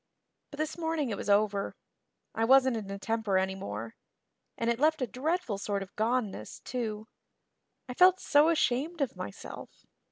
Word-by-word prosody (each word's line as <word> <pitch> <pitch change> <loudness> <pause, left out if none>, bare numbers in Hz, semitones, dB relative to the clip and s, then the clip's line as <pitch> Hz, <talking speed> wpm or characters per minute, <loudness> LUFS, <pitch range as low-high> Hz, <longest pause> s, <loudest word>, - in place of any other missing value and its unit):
But 285 - -11
this 310 +2 -3
morning 320 -6 -1
it - - -1
was 200 - -5
over. 200 -1 +2 0.6
I 225 - -1
wasn't 260 +1 +5
in 210 -3 -5
a 200 - -4
temper 220 -1 0
anymore 115 - -3 0.6
and 230 - -1
it 235 0 +1
left 310 -1 +3
a - - +2
dreadful 255 - -2
sort 200 -1 -2
of 195 - -15
goneness, 220 - -1
too. 220 -3 -4 0.8
I 250 - -5
felt 365 +6 +6
so 295 +2 +4
ashamed 310 +1 +1
of 275 - -1
myself. 100 - -9
230 Hz, 160 wpm, -30 LUFS, 200-290 Hz, 0.8 s, felt